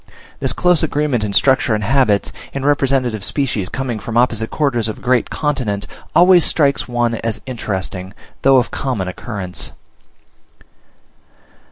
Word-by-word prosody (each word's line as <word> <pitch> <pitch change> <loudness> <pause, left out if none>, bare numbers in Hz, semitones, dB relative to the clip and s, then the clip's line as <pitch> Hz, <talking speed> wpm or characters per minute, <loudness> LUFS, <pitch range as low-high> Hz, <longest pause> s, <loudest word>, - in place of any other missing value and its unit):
This - - +1
close 180 -2 +3
agreement 145 -6 0
in 105 - -2
structure 130 +1 +3
and 105 - -2
habits, 115 -3 +2 0.2
in 135 0 -3
representative 135 -7 +1
species 125 -10 -1
coming 125 -4 -3
from 115 +2 -4
opposite 115 -2 +1
quarters 125 -7 0
of 110 - -4
a - - -15
great 125 -1 +1
continent, 125 -10 -2 0.3
always 180 0 +6
strikes 140 -3 +2
one 120 -1 0
as 115 -1 -2
interesting, 95 -6 -4 0.3
though 135 0 +5
of 125 - +1
common 120 -9 -2
occurrence. 95 -1 -5
120 Hz, 140 wpm, -18 LUFS, 105-135 Hz, 0.3 s, always